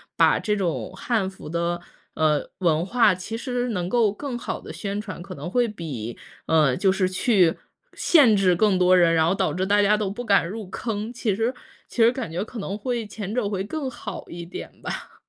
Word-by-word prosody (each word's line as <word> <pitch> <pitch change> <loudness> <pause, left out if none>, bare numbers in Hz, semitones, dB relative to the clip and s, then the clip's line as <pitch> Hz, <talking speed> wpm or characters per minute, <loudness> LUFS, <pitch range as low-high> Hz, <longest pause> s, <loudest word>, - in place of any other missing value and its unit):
把 - - +4
这 210 - 0
种 185 -5 -2
汉 220 -6 0
服 195 - -11
的， 170 +2 -1 0.4
呃， 155 -2 +1
文 165 -3 +2
化 230 +4 +4
其 185 +5 -5
实 245 0 -2
能 180 -6 -2
够 220 +1 +3
更 255 +5 -5
好 - - -4
地 - - -9
宣 200 0 -4
传， 205 -5 -7
可 185 +1 -8
能 145 +4 -6
会 245 +1 +2
比， 145 - -6 0.3
呃， 150 -5 +4
就 190 +7 +3
是 190 -1 +1
去， 185 -2 +3 0.4
限 275 -10 +5
制 190 -3 +3
更 195 0 +3
多 185 0 +5
人， 170 -2 +5
然 160 -1 +3
后 180 - +2
导 155 - 0
致 185 +3 -1
大 205 +1 +4
家 205 +1 +4
都 210 -2 -1
不 245 +5 -6
敢 200 -5 +3
入 215 0 -6
坑， 220 0 -3
其 220 -4 -1
实 225 +4 0 0.3
其 - - -14
实 230 - +6
感 245 -8 -5
觉 175 +4 -2
可 225 +3 -10
能 200 -2 -3
会 235 +1 -2
前 210 -1 -6
者 245 -5 +1
会 195 -2 -2
更 280 +7 -4
好 240 - -7
一 170 0 -7
点 170 - -9
吧。 - - -6
200 Hz, 230 characters per minute, -24 LUFS, 175-225 Hz, 0.4 s, 实